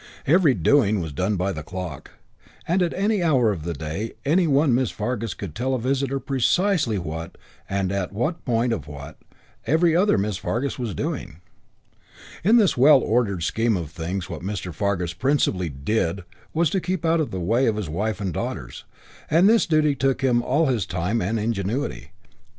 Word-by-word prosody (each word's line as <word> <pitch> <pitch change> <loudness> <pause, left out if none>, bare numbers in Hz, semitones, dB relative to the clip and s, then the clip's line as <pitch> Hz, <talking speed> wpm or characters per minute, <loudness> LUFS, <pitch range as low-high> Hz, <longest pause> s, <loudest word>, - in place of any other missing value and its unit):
Every 155 -3 +4
doing 110 -8 +3
was 80 -4 -5
done 95 +8 0
by 95 +1 -1
the 75 - -5
clock; 90 -3 -7 0.6
and 180 +3 +2
at 175 - +1
any 205 +1 +1
hour 130 -10 +3
of 90 -6 -4
the 85 -1 -3
day 80 +9 -4
any 170 +5 +3
one 140 -2 +3
Miss 125 -1 +2
Fargus 115 -1 -3
could 95 -7 -7
tell 130 +6 -1
a - - -2
visitor 135 +2 -1
precisely 135 - +1
what, 80 0 -6 0.3
and 95 -1 -1
at 100 -2 -2
what 125 - -2
point 120 -1 +1
of 105 - -5
what, 70 +1 -9 0.5
every 160 +2 +3
other 195 +4 +3
Miss 100 -1 -1
Fargus 130 +8 -2
was 115 -5 -3
doing. 125 - -4 1.0
In 220 +7 +5
this 210 -5 +4
well 135 +2 +7
ordered 105 -8 0
scheme 115 +4 +1
of 80 -4 -6
things 90 +3 -4
what 85 -5 -7
Mr. 90 -2 -4
Fargus 95 -4 -1
principally 95 - 0
"did" 85 +6 -1 0.3
was 165 -1 +1
to 190 - 0
keep 185 -2 -2
out 165 +1 +3
of 145 - -2
the 95 - -4
way 115 +9 +1
of 110 - +1
his 105 -4 -3
wife 100 +6 -2
and 95 -4 -3
daughters, - - -5 0.4
and 170 +5 +5
this 225 +1 +4
duty 155 -3 +3
took 135 0 0
him 120 -2 +3
all 145 +7 +1
his 120 -9 0
time 90 +6 -1
and 110 +5 -1
ingenuity. 110 +5 -2
115 Hz, 185 wpm, -23 LUFS, 95-145 Hz, 1.0 s, well